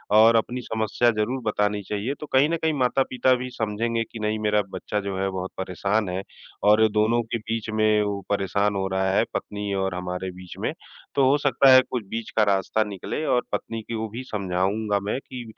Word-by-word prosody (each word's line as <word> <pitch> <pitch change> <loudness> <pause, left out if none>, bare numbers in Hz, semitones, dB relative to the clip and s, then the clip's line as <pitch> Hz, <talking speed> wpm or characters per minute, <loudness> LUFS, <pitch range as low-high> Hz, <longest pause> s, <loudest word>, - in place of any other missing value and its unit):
और 110 +2 +7
अपनी 120 +3 0
समस्या 110 +1 +1
ज़रूर 110 +4 -1
बतानी 105 -1 0
चाहिए। 105 +6 -2
तो - - -6
कहीं 135 +3 +5
न 170 - 0
कहीं 160 -1 +2
माता-पिता 130 0 +2
भी 125 - -4
समझेंगे 115 0 -1
कि 115 - -7
नहीं 110 0 -1
मेरा 105 0 +2
बच्चा 105 - -3
जो 100 -1 -4
है, 95 0 0
बहुत 95 -1 -4
परेशान 100 +2 -1
है 90 +1 -2 0.4
और 105 +1 +6
दोनों 110 +3 +2
के - - +1
बीच 115 0 -4
में 110 0 +3
वो 100 -1 -2
परेशान 100 +1 +1
हो 95 0 -1
रहा 95 0 +1
है, 105 +3 +3
पत्नी 105 -1 -3
और 95 -1 -1
हमारे 90 +1 -4
बीच 90 0 -11
में। - - -1 0.4
तो 135 -2 +4
हो 140 - +4
सकता 135 +1 +5
है 130 - +9
कुछ 125 -5 -3
बीच 115 -1 -4
का 110 - +6
रास्ता 95 +3 +1
निकले 105 - -5
और 125 -4 +2
पत्नी 115 -1 -3
को 110 -1 -3
भी 120 +5 -6
समझाऊँगा 100 +2 0
मैं 130 - -1
कि 125 -2 -7
105 Hz, 205 wpm, -24 LUFS, 100-115 Hz, 0.4 s, है